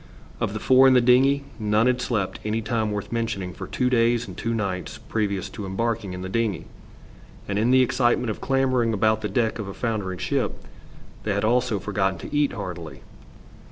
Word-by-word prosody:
Of - - -1
the - - -3
four 130 +1 +6
in 130 - +6
the - - +7
dingey 130 +3 +4 0.2
none 105 +1 +2
had 125 0 +2
slept 105 -7 -2
any 110 +1 -1
time 110 -1 0
worth 105 -1 -4
mentioning 110 -6 -2
for - - -7
two 125 - 0
days 120 -1 +2
and - - -9
two 115 - -3
nights 100 -5 -3
previous 100 -3 -2
to 105 - -7
embarking 105 0 -2
in 90 0 -6
the - - -4
dingey, 105 -3 -1 0.8
and 100 0 -1
in 115 +3 +2
the 130 0 +6
excitement 120 -1 +1
of - - -7
clambering 130 -4 +1
about 110 +1 +2
the 105 - -2
deck 115 -3 0
of 105 - -4
a 95 - -7
foundering 105 -6 -2
ship - - -1 0.7
they 100 -2 -1
had 100 - -1
also 120 -1 +2
forgotten 95 -1 -1
to 145 - -7
eat 145 -1 +2
heartily. 90 -7 -7
110 Hz, 195 wpm, -24 LUFS, 100-125 Hz, 0.8 s, the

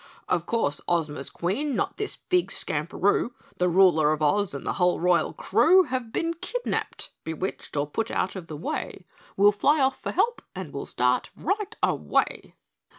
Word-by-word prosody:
"Of 170 -2 0
course 150 -11 0
Ozma's 155 -5 -1
Queen, 240 +11 -2
not - - -1
this 420 - -3
big 360 -1 0
Skamperoo 180 +9 0 0.3
The 180 0 +3
Ruler 170 -4 +5
of 155 0 -1
Oz 195 +2 +2
and 140 - -6
the - - 0
whole 180 0 +3
royal 175 -2 +2
crew 260 - +4
Have 255 -6 -4
been 330 +6 -1
kidnapped 485 +8 -3
bewitched, 160 -1 -4
or 145 - +1
put 220 +10 -3
out 185 - -1
of 180 -3 -7
the 155 - -7
way 175 +3 -4 0.3
We'll 205 +1 +6
fly 285 +9 +2
off 265 -1 +1
for - - -3
help 475 +1 +1
and 185 -6 -6
we'll 140 - -5
start 125 0 +1
right 415 +4 -2
away." - - 0
190 Hz, 170 wpm, -26 LUFS, 160-265 Hz, 0.3 s, We'll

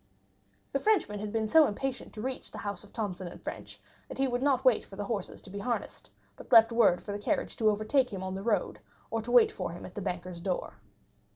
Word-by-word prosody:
The - - +2
Frenchman 390 - +2
had 210 0 -4
been 220 0 0
so 315 +5 +6
impatient 260 +4 -4
to 215 - -6
reach 260 0 -4
the - - -10
house 205 -1 -5
of 205 - -16
Thomson 185 -5 -4
& - - -31
French - - -7 0.3
that - - -7
he 270 0 +2
would 245 -1 -1
not 270 -2 +2
wait 255 -4 +5
for 195 - -12
the 205 - -3
horses 200 -3 -4
to - - -12
be 200 - -5
harnessed, 240 +3 -3 0.3
but - - -13
left 225 -1 +8
word 230 -7 +4
for 205 - -5
the 205 - -3
carriage 205 - -1
to 220 -2 +4
overtake 215 +6 +1
him 190 -2 -5
on 190 0 -3
the 190 - -4
road, 205 - 0 0.3
or 225 0 0
to 230 - -8
wait 245 -2 +6
for 185 - -4
him 175 - -8
at 180 - -10
the 205 - -5
bankers' 180 -2 -4
door. 180 - -3
215 Hz, 245 wpm, -30 LUFS, 195-245 Hz, 0.3 s, left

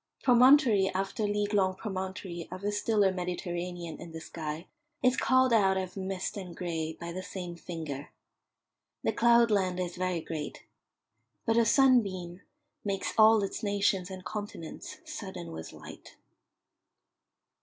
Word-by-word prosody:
Promontory 245 -5 +6
after 195 +2 -1
league 205 0 -1
long 190 -2 +3
promontory 185 -3 -5
of 185 +2 -7
a 205 - 0
stiller 205 -1 +2
Mediterranean 175 -1 -4
in 165 - -9
the 160 - -5
sky 160 0 -6 0.4
is 255 0 +4
called 260 -1 +3
out 195 -4 +4
of 185 -1 -4
mist 190 +1 -3
and 180 -4 -7
grey 160 -3 -3
by 170 0 -5
the 185 +2 -4
same 180 -2 -6
finger. 160 -5 -6 0.9
The - - +1
cloudland 220 -6 +4
is 180 0 -3
very 180 -2 -1
great, 155 -2 -6 0.8
but 225 - +2
a 235 0 +5
sunbeam 200 -9 +3 0.4
makes 200 -2 -2
all 220 -1 +6
its 195 - -3
nations 200 -3 +1
and 185 -1 -8
continents 205 -5 -6
sudden 85 -1 -7
with 80 0 -7
light. - - -12
190 Hz, 135 wpm, -30 LUFS, 175-210 Hz, 0.9 s, Promontory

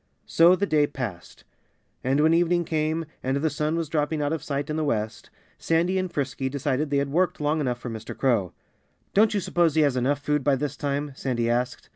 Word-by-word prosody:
So 170 +2 +5
the 200 - 0
day 150 -5 +2
passed. 120 -12 -7 0.6
And 135 +3 +2
when 160 +1 +4
evening 175 0 +2
came, 160 +1 -1 0.2
and 130 +2 0
the 155 +2 0
sun 150 +2 -1
was 165 -1 -1
dropping 150 0 -1
out 145 +1 0
of 160 - -3
sight 140 0 -3
in - - -2
the 155 - 0
west, 110 -6 -2 0.3
Sandy 175 +3 +1
and 185 -1 -3
Frisky 135 -3 -2
decided 140 +1 -1
they 140 - +1
had 140 0 -1
worked 180 +4 +1
long 150 +1 0
enough 125 -4 -1
for 120 0 -7
Mr. 110 0 -7
Crow. 115 -9 +1 0.6
"Don't 215 +1 +4
you - - +2
suppose 170 -3 +1
he 160 - +4
has 140 -4 +2
enough 130 +3 +1
food 150 0 -1
by 140 0 +3
this 145 +1 -3
time?" 145 +1 -2
Sandy 120 -3 -1
asked. 120 0 -2
145 Hz, 215 wpm, -25 LUFS, 130-160 Hz, 0.6 s, So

